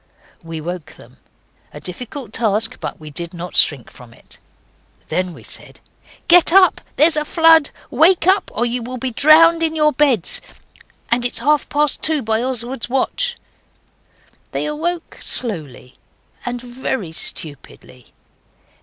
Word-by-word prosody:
We 165 -1 -7
woke 165 -1 -7
them - - -18 0.5
a - - -10
difficult 230 +5 -9
task, 225 +1 -1
but - - -6
we 155 -1 -10
did 170 +4 -5
not 175 +1 -7
shrink 135 -6 +3
from 120 -2 -16
it. - - -14 0.7
Then 185 0 -1
we - - -13
said, - - -6 0.5
'Get 345 -1 +6
up, 375 +1 +5
there 300 - +5
is 330 - +4
a 300 - +1
flood! 325 -1 +4 0.2
Wake 335 +2 +3
up, 380 +2 +2
or 240 - -1
you 240 +1 -2
will 250 +2 -6
be 255 +1 -4
drowned 325 +6 +5
in 320 -1 0
your 300 -1 +3
beds! 260 - +1 0.7
And 240 +1 +2
it's 245 - -1
half 295 +5 +1
past 295 -1 +1
two 310 -3 +1
by 220 +1 0
Oswald's 250 -1 -3
watch.' 480 - -1 1.2
They - - -1
awoke 325 +3 -4
slowly 155 - -3 0.5
and 245 0 -3
very 245 -7 -4
stupidly. 145 -5 -6
245 Hz, 145 wpm, -18 LUFS, -, 1.2 s, Get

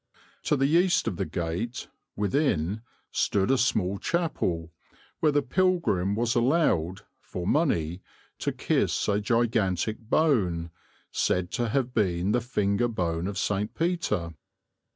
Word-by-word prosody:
To 150 - +3
the 135 - +2
east 175 +5 +3
of 90 - -2
the - - -2
gate, 90 +10 -3 0.3
within, 105 - 0 0.3
stood 100 +4 +1
a 135 - +4
small 100 -6 +1
chapel, 95 - -1 0.5
where 155 - +3
the 145 0 +2
pilgrim 150 - +1
was 115 +1 +1
allowed, 115 - +2 0.2
for 90 - -6
money, 90 - +1 0.4
to - - -1
kiss - - 0
a 100 0 +1
gigantic 110 -3 +1
bone, 105 - +1 0.4
said 90 -1 0
to 120 -1 -1
have 125 +1 0
been 95 -4 +1
the 120 +2 +2
finger 105 -2 0
bone 85 -6 -2
of 100 -1 -4
St. 105 -1 -1
Peter. 160 - -1
105 Hz, 130 wpm, -27 LUFS, 90-135 Hz, 0.5 s, a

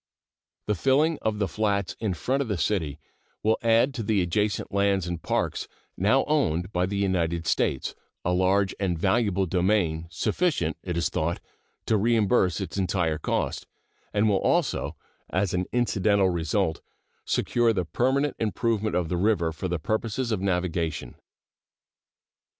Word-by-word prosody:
The 105 - +1
filling 140 - +2
of 110 -1 -1
the 100 -2 0
flats 100 0 -1
in 105 -5 -1
front 135 +9 0
of 135 - -2
the 105 -4 -1
city 80 -4 -1 0.5
will 110 +1 +2
add 115 +4 +3
to 125 - -4
the 105 -3 +1
adjacent 105 +5 -1
lands 100 -2 +2
and 85 -2 -4
parks - - -1 0.3
now 110 +9 +3
owned 90 - 0
by 90 +1 +1
the 100 +1 -3
United 85 -4 0
States 65 - 0 0.3
a 90 - +2
large 95 +2 +2
and 90 -4 0
valuable 100 +1 +1
domain, 90 -3 +1
sufficient, 165 - 0
it 90 -2 -3
is 85 - +1
thought, 85 +2 -1 0.5
to 110 - +2
reimburse 105 -4 +2
its 95 0 -5
entire 90 -4 0
cost, - - -2 0.4
and 105 +1 +2
will 100 -2 +2
also, 170 -7 +1 0.3
as 95 0 0
an 90 0 -1
incidental 100 -5 +2
result, 85 +1 0 0.4
secure 120 -1 +2
the 95 -5 -1
permanent 135 - +1
improvement 110 0 0
of 90 -2 +1
the 90 - -1
river 90 -4 +2
for 85 +4 -4
the 90 -1 -1
purposes 110 - -2
of 105 -4 0
navigation. 85 -8 -1
100 Hz, 150 wpm, -26 LUFS, 90-110 Hz, 0.5 s, add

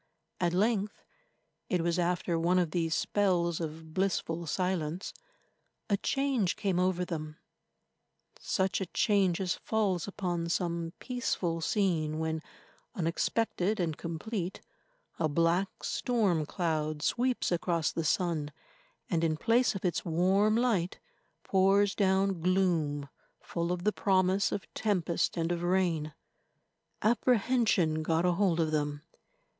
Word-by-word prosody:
At 175 -1 +1
length—it 210 - -3
was 170 +1 0
after 175 -1 0
one 175 +2 +2
of 175 -3 +1
these 165 -2 0
spells 175 -5 +1
of 160 -1 -6
blissful 170 -3 -1
silence—a 185 - -4
change 270 -7 0
came 190 -3 0
over 180 -1 +1
them, 155 -3 -5 1.0
such 190 0 0
a 190 - -2
change 195 -3 +2
as 185 -2 0
falls 200 -6 -1
upon 175 -4 -2
some 170 -1 -1
peaceful 185 -9 -2
scene 160 -6 0
when, 160 0 -2 0.5
unexpected 195 +3 0
and 165 -4 0
complete, 175 +4 -4 0.6
a 160 -2 +1
black 170 +5 +2
stormcloud 160 - 0
sweeps 250 -3 0
across 170 -2 0
the 165 - -2
sun, 155 -3 0 0.6
and, 170 -3 0
in 155 -1 +1
place 230 +5 +2
of 195 - -4
its 175 - 0
warm 190 +6 +2
light, 225 -8 +1 0.5
pours 195 +1 +3
down 190 -2 +1
gloom 165 -6 +1 0.3
full 170 0 -3
of 180 -1 -2
the 210 +1 +2
promise 190 0 +2
of 200 - -3
tempest 180 -6 0
and 165 +1 0
of 170 -1 -1
rain. 175 -4 0 0.9
Apprehension 220 -7 +2
got 165 +2 +1
a 180 - +4
hold 175 -2 +1
of 160 -1 +1
them. 145 -1 -1
180 Hz, 120 wpm, -30 LUFS, 165-195 Hz, 1.0 s, a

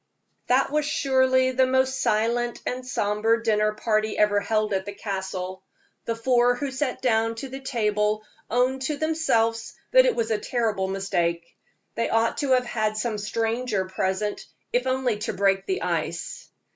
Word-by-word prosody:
That 260 +2 +3
was 300 0 +1
surely 260 -2 +2
the 260 0 +3
most 260 +1 +1
silent 235 +3 +1
and 255 +1 -3
somber 225 -1 +1
dinner 215 -2 +1
party 215 0 0
ever 210 -1 +3
held 215 +1 0
at 190 0 -1
the 205 - -6
Castle. 190 -2 -4 0.4
The 230 - -1
four 245 +1 +3
who 280 +1 -3
sat 265 -1 -3
down 225 -2 +2
to 265 +4 -6
the 265 +1 -7
table 215 -4 0 0.3
owned 255 +3 +1
to 300 - -2
themselves 235 -8 0 0.2
that - - +6
it - - +2
was 225 -1 -1
a 215 - +1
terrible 215 -5 -1
mistake 175 -3 -2 0.4
they 230 - -1
ought 225 0 +1
to 275 -2 +2
have 250 -1 +3
had 215 -2 -1
some 215 -1 -2
stranger 225 -1 -1
present, 190 +2 -2 0.3
if 250 +1 +1
only 255 -4 0
to 215 - -3
break 195 -1 +1
the 380 +1 -1
ice. - - -3
230 Hz, 165 wpm, -25 LUFS, 210-255 Hz, 0.4 s, that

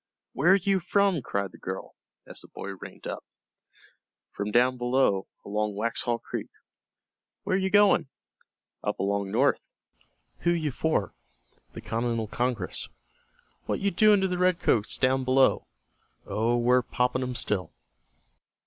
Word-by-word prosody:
"Where 175 +7 +5
you 195 0 +1
from?" 190 -2 +2
cried 100 -5 -3
the - - -15
girl, 95 +1 -6 0.3
as - - -9
the - - -13
boy 100 - -8
reined 95 - -11
up. - - -5 1.1
"From 100 +1 -4
down 125 +4 +3
below, 120 -6 +1 0.2
along 105 0 -2
Waxhaw 115 +2 -1
Creek." - - -6 0.9
"Where 185 - 0
you 190 0 +1
going?" 205 -8 +4 0.7
"Up - - -2
along 100 0 -1
north." 130 +7 +1 0.6
"Who 170 - 0
you 155 -4 -1
for?" 125 - -1 0.6
"The - - -8
Continental 115 0 -1
Congress." 115 -2 -3 0.8
"What - - -1
you 200 0 0
doing 210 +2 +5
to 190 - +2
the 180 -1 -2
Redcoats 175 - +2
down 130 0 +2
below?" 130 +1 +3 0.6
"Oh, 115 +3 0
we're 125 +1 +4
poppin' 125 +1 -1
'em 125 -1 -3
still." 100 -5 -1
125 Hz, 135 wpm, -27 LUFS, 105-170 Hz, 1.1 s, Where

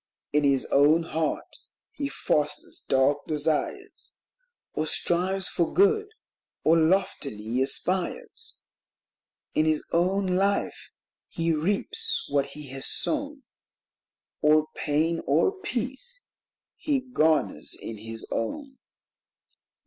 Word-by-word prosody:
In 150 0 +3
his 140 -2 +2
own 150 +4 +5
heart 160 -1 -3 0.3
he 280 -1 -4
fosters 150 - -2
dark 135 +2 +2
desires, 155 0 -2 0.6
Or 155 - -1
strives 185 +4 +1
for 170 0 0
good, 415 +3 +3 0.6
or 160 - +5
loftily 150 - 0
aspires; 180 +7 -2 0.9
In 155 - +2
his 155 -1 +1
own 185 +4 +2
life 195 +2 0 0.4
he 165 0 0
reaps 205 - 0
what 140 -1 +2
he 140 0 -10
has 135 +1 0
sown, 290 -2 +2 1.0
Or 155 0 +4
pain 160 +2 0
or 150 - +3
peace, 270 - -4 0.5
he 290 -3 0
garners 160 - 0
in 110 -2 -7
his 115 +1 -5
own. 265 - -4
160 Hz, 105 wpm, -26 LUFS, 145-200 Hz, 1.0 s, own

